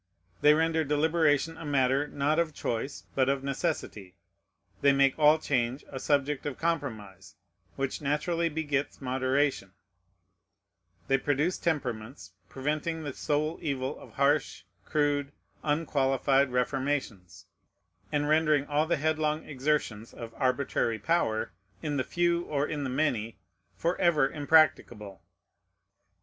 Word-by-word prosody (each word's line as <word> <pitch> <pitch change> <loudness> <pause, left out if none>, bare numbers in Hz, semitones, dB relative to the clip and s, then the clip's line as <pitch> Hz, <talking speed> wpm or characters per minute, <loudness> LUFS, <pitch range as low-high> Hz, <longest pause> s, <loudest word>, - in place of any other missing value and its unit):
They 150 +1 +6
render 160 0 +1
deliberation 155 +1 +1
a - - -8
matter, 140 -1 +1
not 145 +3 0
of 160 -3 -1
choice, 120 +4 -3
but 130 -1 +2
of 135 -1 0
necessity; 135 - -3 0.7
they 140 - +6
make 135 -1 +4
all 150 +1 +6
change 130 -3 -1
a 135 - -6
subject 145 +1 0
of 145 - -4
compromise, 110 - -4 0.4
which 135 +1 -3
naturally 165 +4 0
begets 145 -3 -2
moderation; 130 -5 0 1.3
they 135 - +3
produce 145 +6 0
temperaments, 125 - -3 0.2
preventing 155 +4 -2
the 145 -2 -4
sore 155 +3 -1
evil 135 -4 -2
of - - -14
harsh, 140 +1 +1 0.2
crude, 145 -2 0 0.3
unqualified 140 -3 +1
reformations, 125 - -2 0.7
and 145 0 0
rendering 155 -2 +3
all 150 +2 0
the 170 - +1
headlong 155 0 0
exertions 130 -6 -2
of 115 -1 -8
arbitrary 130 -3 0
power, 110 - 0 0.3
in 150 -2 -1
the 130 - +1
few 170 +2 +1
or 145 -1 -1
in 150 -2 -3
the 130 - -2
many, 125 -5 -1 0.4
forever 170 -4 +2
impracticable. 140 - +2
145 Hz, 120 wpm, -29 LUFS, 130-155 Hz, 1.3 s, They